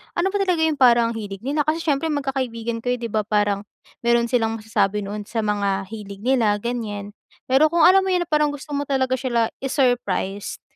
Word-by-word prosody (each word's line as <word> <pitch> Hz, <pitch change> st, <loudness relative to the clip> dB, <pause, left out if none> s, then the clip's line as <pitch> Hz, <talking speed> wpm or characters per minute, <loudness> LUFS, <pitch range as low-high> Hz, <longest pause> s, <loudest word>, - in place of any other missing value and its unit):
ano 345 Hz, +2 st, +1 dB
ba 405 Hz, -, 0 dB
talaga 360 Hz, -4 st, +1 dB
yung 315 Hz, -2 st, +1 dB
parang 235 Hz, -2 st, +5 dB
ang -, -, -7 dB
hilig 200 Hz, -2 st, -7 dB
nila, 290 Hz, +3 st, -1 dB
kasi 320 Hz, +2 st, 0 dB
siyempre 300 Hz, 0 st, 0 dB
magkakaibigan 260 Hz, -6 st, -2 dB
kayo 245 Hz, -, +1 dB
di 235 Hz, -, -3 dB
ba 215 Hz, -1 st, -1 dB
parang, 205 Hz, -1 st, 0 dB, 0.4 s
meron 235 Hz, 0 st, +3 dB
silang 225 Hz, -2 st, +1 dB
masasabi 210 Hz, -1 st, 0 dB
noon 205 Hz, +1 st, -5 dB
sa 225 Hz, +2 st, -2 dB
mga 200 Hz, -2 st, -1 dB
hilig 200 Hz, -2 st, -9 dB
nila 240 Hz, -4 st, +2 dB
ganyan. 210 Hz, -4 st, -4 dB, 0.4 s
Pero 270 Hz, +4 st, +5 dB
kung 335 Hz, +1 st, +1 dB
alam 380 Hz, +1 st, +6 dB
mo 380 Hz, -, +1 dB
yun 355 Hz, -, +2 dB
na 345 Hz, -, -17 dB
parang 300 Hz, -1 st, +2 dB
gusto 290 Hz, +1 st, -9 dB
mo 285 Hz, -, -2 dB
talaga 260 Hz, -1 st, 0 dB
sila 235 Hz, -3 st, 0 dB
i-surprise, 245 Hz, -7 st, -1 dB
235 Hz, 200 wpm, -22 LUFS, 210-285 Hz, 0.4 s, alam